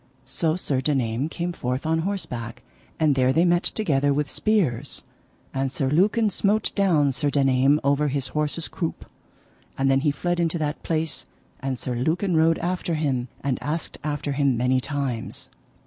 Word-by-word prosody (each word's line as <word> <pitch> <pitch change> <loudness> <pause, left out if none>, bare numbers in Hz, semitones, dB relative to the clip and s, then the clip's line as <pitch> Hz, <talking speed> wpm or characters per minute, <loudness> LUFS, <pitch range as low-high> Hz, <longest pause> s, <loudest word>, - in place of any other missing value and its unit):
So 155 +4 0
Sir 140 -7 -1
Daname 130 -1 0
came 175 +1 -3
forth 125 -2 -3
on 160 0 +2
horseback, 125 - -4 0.4
and 155 -3 +4
there 130 -1 +3
they 165 +6 +3
met 175 0 +3
together 145 -11 +1
with 145 0 0
spears, 150 - 0 0.5
and 135 0 -1
Sir 135 0 -1
Lucan 210 +7 +3
smote 210 +2 +1
down 165 -8 +3
Sir 145 +2 0
Daname 135 0 +3
over 140 +2 +2
his 140 -1 -1
horse's 150 +2 -1
croup, 165 -3 -4 0.7
and 135 0 +2
then 135 - +4
he 145 +2 +2
fled 175 +4 -1
into 170 0 +1
that 150 -1 -2
place, 155 -4 -2 0.3
and 135 -1 -2
Sir 125 - -4
Lucan 160 +9 0
rode 160 +1 +4
after 175 -1 -1
him, 135 -5 0 0.2
and 135 -2 -1
asked 155 +2 -4
after 145 -1 -2
him 140 -3 +2
many 125 +2 +2
times. 135 -4 -4
145 Hz, 165 wpm, -24 LUFS, 135-165 Hz, 0.7 s, and